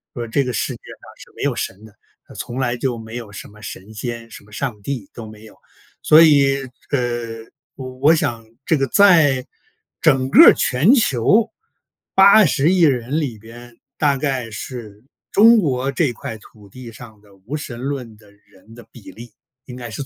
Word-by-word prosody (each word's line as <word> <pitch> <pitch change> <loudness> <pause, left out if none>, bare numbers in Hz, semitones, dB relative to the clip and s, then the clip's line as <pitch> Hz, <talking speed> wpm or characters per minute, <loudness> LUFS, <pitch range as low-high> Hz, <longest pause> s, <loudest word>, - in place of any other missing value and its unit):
说： 120 -2 -4
“这 140 +5 0
个 125 - -4
世 110 - -3
界 - - -12
上 - - -14 0.2
是 - - -15
没 - - -6
有 - - -1
神 100 +3 -6
的， 110 0 -18 0.3
它 - - -16
从 125 +2 -7
来 120 -2 -1
就 120 -1 -3
没 110 +1 -10
有 115 -4 -8
什 105 - -10
么 105 +1 -18
神 105 0 -10
仙， 115 +1 -7
什 - - -13
么 105 - -22
上 105 -2 -5
帝 125 -5 -6
都 115 - -9
没 110 0 -13
有”。 110 - -16 0.5
所 155 +2 +6
以， 140 -3 +4 0.3
呃， 120 -4 -3 0.3
我 130 -1 -8
我 150 +4 +5
想 115 -7 -3 0.2
这 160 - +2
个 135 - 0
在 155 -8 +4 0.6
整 130 0 +2
个 - - +8
全 130 - +2
球 210 - +2 0.6
80 190 -6 +5
亿 185 -2 +1
人 135 0 +1
里 120 -7 -4
边， 120 +2 -14 0.2
大 145 -2 +1
概 130 -4 -3
是 110 -1 -9 0.3
中 230 +3 +6
国 135 -8 -1
这 140 -1 0
块 115 -1 -8
土 105 -1 -19
地 120 +3 -12
上 110 -2 -14
的 100 -2 -22
无 110 +10 -8
神 130 -5 -7
论 125 -4 -6
的 105 -1 -21
人 105 +2 -21
的 120 -2 -14
比 115 -5 -14
例 120 +1 -12 0.3
应 125 - -10
该 120 - -9
是 - - -12
120 Hz, 200 characters per minute, -19 LUFS, 110-140 Hz, 0.6 s, 个